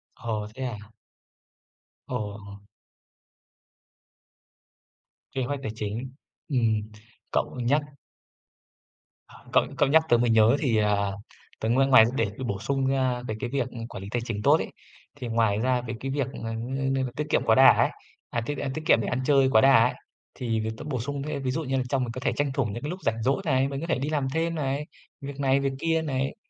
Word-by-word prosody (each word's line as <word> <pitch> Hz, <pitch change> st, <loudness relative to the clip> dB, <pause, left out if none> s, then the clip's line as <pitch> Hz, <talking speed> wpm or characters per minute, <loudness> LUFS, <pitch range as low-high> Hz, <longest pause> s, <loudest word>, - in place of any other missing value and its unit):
Ờ, 110 Hz, -4 st, -3 dB
thế 130 Hz, -, -5 dB
à? 120 Hz, -4 st, -4 dB, 1.3 s
Ồ! 100 Hz, -1 st, -6 dB, 2.7 s
Kế 130 Hz, -, -2 dB
hoạch 140 Hz, +3 st, -2 dB
tài 110 Hz, -, -3 dB
chính, 115 Hz, +5 st, -4 dB, 0.4 s
ừm. 110 Hz, -6 st, +1 dB, 0.4 s
Cậu -, -, -1 dB
nhắc 135 Hz, +5 st, +2 dB, 1.5 s
h -, -, -19 dB, 0.2 s
cậu -, -, +6 dB
cậu -, -, +3 dB
nhắc 160 Hz, +2 st, +5 dB
tớ 120 Hz, -, +6 dB
mới 120 Hz, 0 st, +2 dB
nhớ 110 Hz, +2 st, +5 dB
thì, 120 Hz, -6 st, +1 dB
à, 100 Hz, -2 st, +2 dB, 0.5 s
tớ 110 Hz, -, -1 dB
ngoài 135 Hz, +3 st, +3 dB
ngoài 130 Hz, -5 st, +8 dB
để 140 Hz, -, +1 dB, 0.2 s
bổ 100 Hz, -3 st, -2 dB
sung 135 Hz, +5 st, -1 dB
ra 130 Hz, -2 st, +1 dB
cái 110 Hz, -1 st, -3 dB
cái 120 Hz, -, -3 dB
việc 135 Hz, -2 st, -1 dB, 0.2 s
quản 95 Hz, -, -8 dB
lý 100 Hz, -, -7 dB
tài 120 Hz, -, -1 dB
chính 110 Hz, -4 st, -3 dB
tốt -, -, +5 dB
ấy, -, -, -5 dB, 0.4 s
thì 125 Hz, -, -6 dB
ngoài 115 Hz, -3 st, +2 dB
ra 125 Hz, +1 st, +1 dB
về 120 Hz, -1 st, -5 dB
cái 135 Hz, 0 st, -4 dB
việc, 140 Hz, -2 st, -1 dB, 0.2 s
ờ, 115 Hz, -, -3 dB
ng 135 Hz, +4 st, -2 dB
như 135 Hz, 0 st, 0 dB
là 125 Hz, -, -3 dB
tiết 150 Hz, -, -2 dB
kiệm -, -, +2 dB
quá 110 Hz, -, +5 dB
đà 135 Hz, +2 st, +9 dB
ấy, -, -, +3 dB, 0.4 s
à, 120 Hz, -, -1 dB
tiết 145 Hz, +2 st, -3 dB
ăn 135 Hz, 0 st, -3 dB
tiết 155 Hz, -, -4 dB
kiệm 115 Hz, -, +5 dB
để -, -, -3 dB
ăn 120 Hz, -, -1 dB
chơi 135 Hz, -2 st, +4 dB
quá 110 Hz, -, +6 dB
đà 135 Hz, -4 st, +7 dB
ấy, 125 Hz, -, 0 dB, 0.4 s
thì 115 Hz, -4 st, -1 dB
việc 110 Hz, 0 st, -2 dB
tớ -, -, -8 dB
bổ 135 Hz, -5 st, -3 dB
sung 140 Hz, +3 st, -4 dB
thêm, 145 Hz, -2 st, -4 dB
ví 130 Hz, -, 0 dB
dụ 160 Hz, +5 st, -2 dB
như 135 Hz, -2 st, -1 dB
là 130 Hz, -, +1 dB
trong 135 Hz, -1 st, +1 dB
mình 120 Hz, -, -3 dB
có 130 Hz, -, -6 dB
thể -, -, +1 dB
tranh 145 Hz, -1 st, 0 dB
thủ 135 Hz, -2 st, +1 dB
những 115 Hz, +3 st, -5 dB
cái 145 Hz, -, -3 dB
lúc 180 Hz, +3 st, -5 dB
rảnh 115 Hz, 0 st, -1 dB
rỗi 135 Hz, +8 st, +1 dB
này, 130 Hz, -3 st, +2 dB
mình 140 Hz, 0 st, -4 dB
có 165 Hz, -, -4 dB
thể 130 Hz, -, 0 dB
đi 140 Hz, -, -2 dB
làm 145 Hz, -3 st, 0 dB
thêm 165 Hz, +1 st, 0 dB
này, 140 Hz, -1 st, -2 dB, 0.4 s
việc 140 Hz, 0 st, -7 dB
này 135 Hz, -1 st, +3 dB
việc 135 Hz, -1 st, -1 dB
kia 165 Hz, +1 st, +1 dB
này 135 Hz, -3 st, -2 dB
130 Hz, 215 wpm, -26 LUFS, 115-140 Hz, 2.7 s, đà